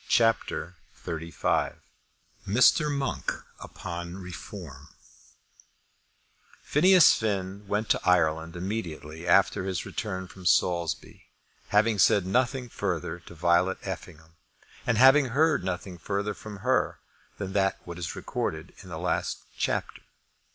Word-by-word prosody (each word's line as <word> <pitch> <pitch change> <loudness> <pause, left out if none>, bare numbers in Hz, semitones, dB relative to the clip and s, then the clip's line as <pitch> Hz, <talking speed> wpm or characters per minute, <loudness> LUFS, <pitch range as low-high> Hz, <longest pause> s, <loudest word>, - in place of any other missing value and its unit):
CHAPTER 115 -6 +1 0.3
XXXV 85 -1 -1 0.7
Mr. 130 +8 +4
Monk 140 -2 -1 0.3
upon 85 0 -7
Reform 85 -5 -9 1.8
Phineas 180 +3 +6
Finn 100 -2 -2
went 105 +2 -1
to - - +2
Ireland 80 -2 +2
immediately 85 -4 -5
after 95 +1 +4
his 95 -3 -3
return 95 -3 -4
from 90 0 -6
Saulsby, 85 0 0 0.4
having 105 0 +3
said 95 0 +5
nothing 125 +5 0
further 90 -6 -3
to 85 - -14
Violet 85 +3 +2
Effingham, 80 0 -8 0.5
and 115 - +2
having 135 +4 +7
heard 140 - +2
nothing 90 -1 -4
further 100 +4 -2
from 105 +2 -9
her 130 0 +2 0.4
than 95 -2 -5 0.3
what 85 0 -7
is 85 -3 -4
recorded - - -4
in - - -13
the - - -5
last - - -2
chapter. - - -2
95 Hz, 115 wpm, -27 LUFS, 85-110 Hz, 1.8 s, having